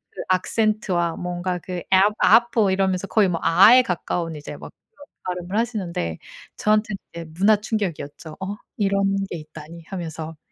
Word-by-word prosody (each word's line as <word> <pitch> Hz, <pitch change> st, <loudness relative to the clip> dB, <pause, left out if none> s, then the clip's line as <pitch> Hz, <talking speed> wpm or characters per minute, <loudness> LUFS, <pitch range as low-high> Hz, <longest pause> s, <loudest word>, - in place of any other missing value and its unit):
그 -, -, -7 dB
악센트와 185 Hz, -3 st, 0 dB
뭔가 180 Hz, 0 st, -3 dB
그 180 Hz, +1 st, -7 dB, 0.2 s
"app 200 Hz, +3 st, +5 dB
apple." 225 Hz, -1 st, +4 dB
이러면서 190 Hz, 0 st, 0 dB
거의 205 Hz, -2 st, +3 dB
뭐 170 Hz, -2 st, -2 dB
아에 210 Hz, +9 st, +7 dB
가까운 170 Hz, -4 st, -3 dB
이제 150 Hz, -, -8 dB
막 -, -, -11 dB, 0.2 s
그런 285 Hz, -6 st, -16 dB, 0.2 s
발음을 180 Hz, +2 st, -3 dB
하시는데 185 Hz, -, -2 dB, 0.4 s
저한테는 215 Hz, -1 st, +1 dB, 0.2 s
이제 170 Hz, 0 st, -7 dB
문화 210 Hz, +3 st, +5 dB
충격이었죠. 175 Hz, -8 st, -4 dB
'어? 190 Hz, +2 st, -3 dB, 0.2 s
이런 200 Hz, -1 st, +1 dB, 0.3 s
게 175 Hz, -, -4 dB
있다니.' 155 Hz, +2 st, -11 dB
하면서. 160 Hz, -4 st, -6 dB
185 Hz, 360 characters per minute, -23 LUFS, 170-210 Hz, 0.4 s, 아에